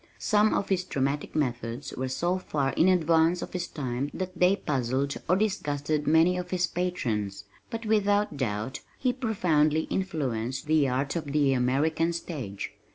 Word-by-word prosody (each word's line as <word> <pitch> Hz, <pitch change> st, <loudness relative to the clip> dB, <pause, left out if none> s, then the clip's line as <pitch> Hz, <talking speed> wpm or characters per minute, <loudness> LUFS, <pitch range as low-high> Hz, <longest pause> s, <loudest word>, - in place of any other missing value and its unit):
Some 215 Hz, 0 st, +3 dB
of 200 Hz, -, -1 dB
his 185 Hz, -2 st, +1 dB
dramatic 140 Hz, -3 st, -2 dB
methods 120 Hz, -2 st, -2 dB
were 130 Hz, +1 st, -3 dB
so 175 Hz, +8 st, 0 dB
far 140 Hz, -6 st, -1 dB
in 170 Hz, -, +4 dB
advance 170 Hz, -1 st, +3 dB
of -, -, -8 dB
his 180 Hz, -1 st, -2 dB
time 135 Hz, -1 st, -3 dB
that 185 Hz, 0 st, -4 dB
they 180 Hz, +2 st, +4 dB
puzzled 135 Hz, -3 st, -1 dB
or 180 Hz, -, +5 dB
disgusted 155 Hz, -7 st, -1 dB
many 165 Hz, +4 st, +4 dB
of 180 Hz, 0 st, -6 dB
his 180 Hz, -1 st, +1 dB
patrons, 110 Hz, -, -2 dB, 0.3 s
but 230 Hz, 0 st, -5 dB
without 205 Hz, -4 st, +2 dB
doubt 115 Hz, -2 st, -2 dB, 0.2 s
he 255 Hz, -2 st, +1 dB
profoundly 165 Hz, -, +2 dB
influenced 130 Hz, -10 st, -2 dB
the 155 Hz, -2 st, +3 dB
art 135 Hz, +4 st, -1 dB
of 165 Hz, -, -2 dB
the 140 Hz, -1 st, +2 dB
American 150 Hz, +7 st, +1 dB
stage. 135 Hz, -, -5 dB
155 Hz, 160 wpm, -27 LUFS, 135-180 Hz, 0.3 s, or